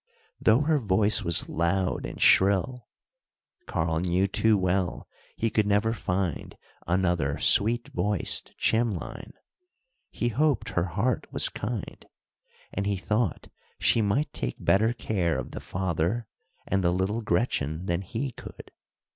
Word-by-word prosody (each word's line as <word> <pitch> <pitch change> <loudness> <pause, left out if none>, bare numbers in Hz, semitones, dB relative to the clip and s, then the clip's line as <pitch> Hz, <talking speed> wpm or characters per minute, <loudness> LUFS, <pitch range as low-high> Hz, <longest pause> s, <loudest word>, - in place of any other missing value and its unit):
Though 115 +4 +4
her 150 0 +2
voice 105 -1 +2
was 85 -2 +3
loud 90 +3 -1
and - - -9
shrill 100 +6 +3 0.8
(Karl 80 0 -1
knew 90 +2 +1
too 105 +2 +2
well 95 -1 -1 0.3
he 115 -1 -1
could 110 -2 +1
never 105 +2 +2
find 90 -6 -3 0.3
another 85 -5 +1
sweet 115 +3 +3
voiced 100 +1 -1
Chimlein) 110 -6 -1 0.8
he 120 - -2
hoped 145 +4 +1
her 90 - 0
heart 100 +8 -1
was - - +2
kind, 105 -1 -5 0.7
and 100 0 -2
he 100 -1 0
thought 105 0 -1 0.3
she 115 - +3
might 110 +9 0
take 60 -1 -3
better 110 +4 +4
care 95 - -1
of - - -5
the - - -6
father 90 +5 -2 0.4
and 95 0 0
the 85 - +3
little 95 +6 -1
Gretchen 90 - -1
than 85 0 -1
he 115 +8 -4
could. - - -11
100 Hz, 135 wpm, -27 LUFS, 90-110 Hz, 0.8 s, Though